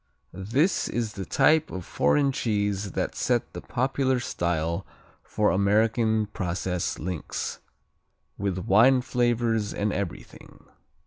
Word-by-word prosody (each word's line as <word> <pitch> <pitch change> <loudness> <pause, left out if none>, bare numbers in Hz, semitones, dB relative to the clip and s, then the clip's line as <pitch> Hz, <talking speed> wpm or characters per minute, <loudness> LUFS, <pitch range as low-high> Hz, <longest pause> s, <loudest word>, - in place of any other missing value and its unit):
This 125 - +1
is 115 -3 -2
the 95 -1 -6
type 160 0 +3
of 95 -2 -6
foreign 140 - +2
cheese 105 -5 -1
that - - -2
set - - 0
the - - -6
popular 130 0 0
style 85 -6 -2 0.4
for 105 -1 0
American 110 +2 +2
processed 90 -3 -3
links, 90 -2 -4 0.8
with 100 -2 -2
wine 125 +6 +5
flavors 120 -3 0
and 105 0 -1
everything. 95 -2 -7
105 Hz, 115 wpm, -26 LUFS, 95-120 Hz, 0.8 s, wine